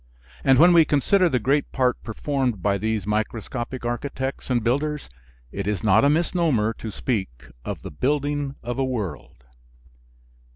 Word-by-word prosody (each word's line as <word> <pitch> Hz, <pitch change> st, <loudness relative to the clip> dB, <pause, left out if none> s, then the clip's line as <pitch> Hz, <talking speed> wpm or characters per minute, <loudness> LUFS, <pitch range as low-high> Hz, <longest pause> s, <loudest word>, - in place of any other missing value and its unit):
And 135 Hz, -, +5 dB
when 175 Hz, +5 st, +7 dB
we 165 Hz, -1 st, +7 dB
consider 175 Hz, +6 st, +3 dB
the 130 Hz, -, +1 dB
great 140 Hz, +5 st, 0 dB
part 125 Hz, -2 st, +1 dB
performed 125 Hz, -, -2 dB
by 100 Hz, -1 st, +1 dB
these 110 Hz, -2 st, -1 dB
microscopic 115 Hz, +4 st, -3 dB
architects 130 Hz, +3 st, -4 dB
and 120 Hz, -3 st, +1 dB
builders 145 Hz, -, -1 dB, 0.4 s
it 100 Hz, 0 st, -4 dB
is 105 Hz, -1 st, -1 dB
not 105 Hz, 0 st, +4 dB
a 140 Hz, -, +5 dB
misnomer 155 Hz, -, +1 dB
to 110 Hz, -, -5 dB
speak 95 Hz, -, -4 dB
of -, -, -5 dB
the -, -, -7 dB
building 145 Hz, -, -1 dB
of 120 Hz, +2 st, -4 dB
a -, -, +2 dB
world. 100 Hz, -, -5 dB
125 Hz, 155 wpm, -24 LUFS, 110-145 Hz, 0.4 s, when